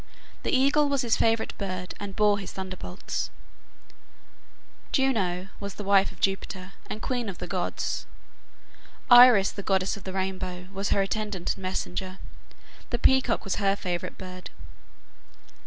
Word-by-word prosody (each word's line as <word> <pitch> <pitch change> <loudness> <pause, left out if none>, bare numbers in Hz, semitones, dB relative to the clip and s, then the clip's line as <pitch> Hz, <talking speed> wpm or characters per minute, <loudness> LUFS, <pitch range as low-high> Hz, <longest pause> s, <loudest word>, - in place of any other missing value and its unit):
The - - -2
eagle 280 +3 +4
was 280 -2 +1
his 235 -2 +2
favorite 225 0 +1
bird, 185 -2 -4
and 200 -1 -6
bore 210 -1 +3
his 195 - -6
thunderbolts. 185 0 -4 1.6
Juno 235 -10 +2
(Hera) 195 - -14
was 200 -1 -6
the 210 - -6
wife 195 -1 +4
of - - -17
Jupiter, 190 -1 -2 0.2
and 215 - -5
queen 245 -4 -1
of 185 - -7
the - - -5
gods. - - -2 1.0
Iris, 245 -5 +9
the 200 - -6
goddess 195 +1 +1
of 200 - -12
the 190 - -6
rainbow, 185 -1 -3
was 195 +1 -2
her 200 - +3
attendant 205 -2 -2
and - - -13
messenger. 185 0 -3 0.7
The - - -1
peacock 265 -3 +3
was 195 - -2
her 195 -1 +2
favorite 175 -3 -4
bird. 185 -1 -8
195 Hz, 150 wpm, -27 LUFS, 185-220 Hz, 1.6 s, Iris